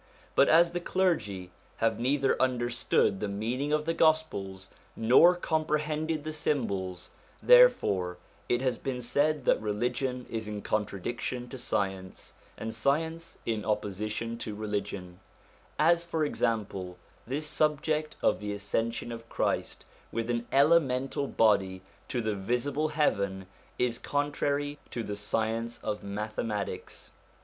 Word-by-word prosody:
But 140 - +5
as 170 +2 +6
the 175 - -2
clergy 110 - 0 0.3
have 115 -1 +1
neither 135 +2 +2
understood 120 -5 +1
the 105 - -2
meaning 120 +8 -2
of 150 0 +1
the 165 - +1
Gospels 130 - +1 0.3
nor 130 +10 +6
comprehended 155 -1 -1
the 155 0 -4
symbols, 100 - -2 0.3
therefore 100 - +5 0.3
it 120 +1 +1
has 125 -3 0
been 125 -2 -3
said 145 +3 +1
that - - +3
religion 125 +4 -1
is 110 -2 -4
in 105 -1 -5
contradiction 110 +4 -2
to 135 - -7
science, 95 -4 -3 0.2
and 110 0 -4
science 160 +8 -1
in 110 -2 -1
opposition 105 +2 -2
to 105 - -5
religion; 100 -4 -4 0.6
as, 170 +2 +4
for 165 -2 -1
example, 100 -9 -2 0.3
this 145 +5 -2
subject 155 0 0
of - - +3
the 105 0 -3
ascension 115 +4 -2
of 115 -1 -8
Christ - - -1 0.3
with 115 +1 -2
an 120 0 -2
elemental 140 -2 +3
body 95 -6 +2 0.2
to 125 - -1
the 110 -1 -1
visible 125 +9 -1
heaven 100 -11 0 0.3
is 125 -1 0
contrary 145 0 -1
to 120 - -4
the 105 -1 -4
science 115 +3 -2
of 105 - -2
mathematics. 105 0 -4
120 Hz, 130 wpm, -29 LUFS, 105-150 Hz, 0.6 s, as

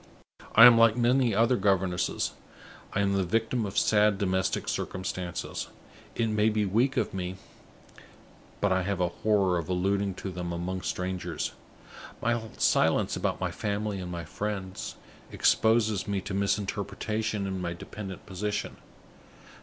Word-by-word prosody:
I 115 - +11
am 120 -1 +9
like 115 0 +5
many 120 -2 +3
other 115 +3 +3
governesses; 95 -3 +1 0.6
I 100 - +1
am 100 0 +1
the 100 -1 +2
victim 110 +4 0
of 95 - -6
sad 105 -1 +4
domestic 95 -1 0
circumstances. 95 -2 -4 0.5
It 115 - +1
may 105 0 +3
be 105 -1 0
weak 120 +8 +1
of - - 0
me, 90 -1 -3 1.3
but 100 - +2
I 95 0 +2
have 100 +1 -2
a 90 -1 +2
horror 95 -2 +1
of 85 - -6
alluding 95 +1 0
to 95 - -5
them 90 -1 -4
among 90 +2 -3
strangers. 90 0 -3 0.7
My 120 0 0 0.2
silence - - +2
about - - -1
my - - -1
family 105 -1 -2
and 90 -1 -5
my 85 -1 -5
friends 95 +1 -4 0.4
exposes 110 -3 +2
me 100 -1 0
to 100 +1 -6
misinterpretation 100 +1 -1
in 95 -1 -3
my 85 -1 -2
dependent 95 +2 -8
position. 100 +2 -3
100 Hz, 145 wpm, -28 LUFS, 95-110 Hz, 1.3 s, I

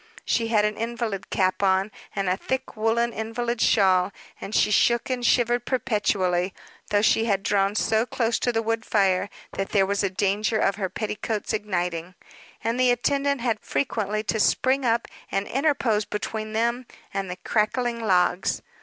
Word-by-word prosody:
She 230 -1 +1
had 215 -2 +3
an 210 0 -1
invalid 230 -4 -3
cap 185 0 +1
on, 190 +1 +2 0.2
and 195 -2 -1
a 180 - +2
thick 260 +7 -4
woolen 225 +2 +1
invalid 235 +1 -3
shawl, 190 -2 +4 0.3
and 205 - -5
she - - +3
shook 235 +4 +3
and 250 -1 -2
shivered 240 -1 +2
perpetually; 200 -8 0 0.3
though 205 0 +2
she 225 +1 +3
had 200 -3 0
drawn 200 0 +1
so 220 +2 +1
close 230 -2 0
to 245 - +1
the 225 -1 -1
wood 225 0 -1
fire 195 -3 +2 0.3
that 195 - -2
there 195 -2 +4
was 200 +1 0
a 195 - +1
danger 205 +3 0
of 195 -2 +1
her 190 -3 -2
petticoats 215 +1 -3
igniting, 180 -4 -2 0.5
and 230 +3 -1
the 255 -1 +4
attendant 275 +2 +1
had 230 -3 0
frequently 215 -6 -2
to 220 +1 -1
spring 260 +5 +2
up 230 0 +1 0.2
and 195 - 0
interpose 255 -6 +1
between 215 +1 -4
them 235 +3 0 0.3
and 195 -1 -2
the 180 - -4
crackling 235 +3 0
logs. 180 -2 +1
215 Hz, 170 wpm, -25 LUFS, 195-235 Hz, 0.5 s, shawl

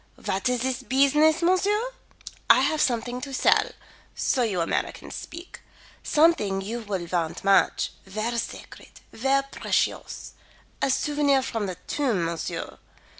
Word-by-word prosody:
"What 190 +5 -2
is 250 -1 0
this 260 0 -1
beesiness, 295 +5 +3
monsieur? 410 +7 +2 0.6
I - - +7
have 310 - +1
something 245 0 0
to 275 - -6
sell - - +3 0.5
so 260 - +1
you 210 -7 0
Americans 165 - -3
speak. 340 +2 -9 0.4
Something 295 -12 +3
you 215 +5 -4
will 200 -6 -4
want 170 -2 -2
much 195 0 +3 0.2
ver 215 +5 -3
sacred, - - -9
ver 270 +3 +1
precious. - - -2 0.5
A - - +2
souvenir 285 0 +2
from 225 -5 -3
the 185 - -4
tomb, 235 - 0
monsieur. 165 0 -4
250 Hz, 130 wpm, -25 LUFS, 200-295 Hz, 0.6 s, I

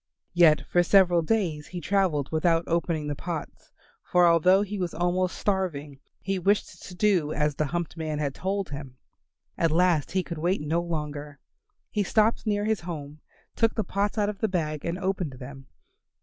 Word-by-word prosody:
Yet 170 -3 +5
for 175 - +3
several 175 -1 +4
days 165 -5 -1
he 180 - -6
travelled 175 -7 0
without 165 +1 +2
opening 165 -2 -1
the 145 - -2
pots, 160 +1 -7 0.3
for 180 0 +3
although 180 +4 +5
he 205 0 -5
was 180 -2 -3
almost 180 +2 0
starving 155 -8 -2 0.2
he 195 +1 -2
wished 200 +3 0
to 180 - -10
do 180 -6 +2
as 150 0 0
the 155 - -1
humped 170 +1 -3
man 155 -2 -3
had 145 -2 -2
told 195 +3 -2
him. 140 -3 -8 0.6
At 165 - +3
last 170 -2 +2
he 190 -1 +1
could 170 -3 -6
wait 175 +1 0
no 160 +3 0
longer. 150 -3 -5 0.5
He 210 - 0
stopped 215 +3 +1
near 205 -1 +1
his 220 -2 +1
home, 155 -4 -7 0.4
took 225 -1 +2
the 220 - 0
pots 200 +3 -1
out 205 -1 +2
of 210 -1 -4
the 220 - +1
bag 155 -6 -2
and 170 +1 -2
opened 185 -6 -2
them. 135 +1 -10
175 Hz, 180 wpm, -26 LUFS, 150-190 Hz, 0.6 s, Yet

